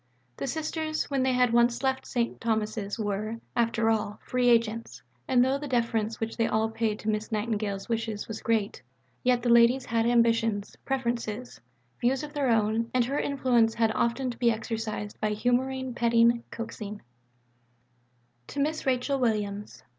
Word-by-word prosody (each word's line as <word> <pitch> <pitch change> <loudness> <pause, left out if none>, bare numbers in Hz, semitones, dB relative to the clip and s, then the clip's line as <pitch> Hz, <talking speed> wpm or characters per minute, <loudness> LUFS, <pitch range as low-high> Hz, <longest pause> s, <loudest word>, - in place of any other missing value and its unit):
The - - -3
Sisters 315 +2 -2
when 275 -1 +1
they 260 0 +2
had 250 -2 +3
once 235 +2 +3
left 265 0 0
St. 235 -2 -2
Thomas's 215 -2 -1
were, 215 +1 -2 0.2
after 230 -1 +2
all, 210 -1 -1
free 250 -1 +2
agents; 230 -1 +1 0.2
and 250 -1 +4
though 270 +2 +1
the 290 - -5
deference 230 -3 0
which 225 0 -3
they 230 - +2
all 220 +1 +1
paid 220 -1 -1
to - - -8
Miss 215 +1 -2
Nightingale's 210 -2 -2
wishes 225 -2 -2
was 220 -1 -6
great, 220 -3 0 0.4
yet 250 -2 +2
the 245 - +1
ladies 235 +2 +5
had 230 0 +1
ambitions, 230 -3 +2
preferences, 240 -3 -3 0.4
views 260 +4 +1
of 295 0 -7
their 285 -4 0
own, 225 0 +2
and 250 -2 +4
her 275 +4 -1
influence 245 -5 +2
had 225 -1 +2
often 240 +3 0
to 235 - -11
be 240 -1 +4
exercised 220 -2 -3
by 215 -1 +1
humouring, 255 +3 0
petting, 235 0 +3
coaxing: 215 -2 -7 1.4
(_To 285 - -6
Miss 305 +1 -1
Rachel 265 +2 +1
Williams. 210 -4 -2
230 Hz, 160 wpm, -28 LUFS, 220-250 Hz, 1.4 s, ladies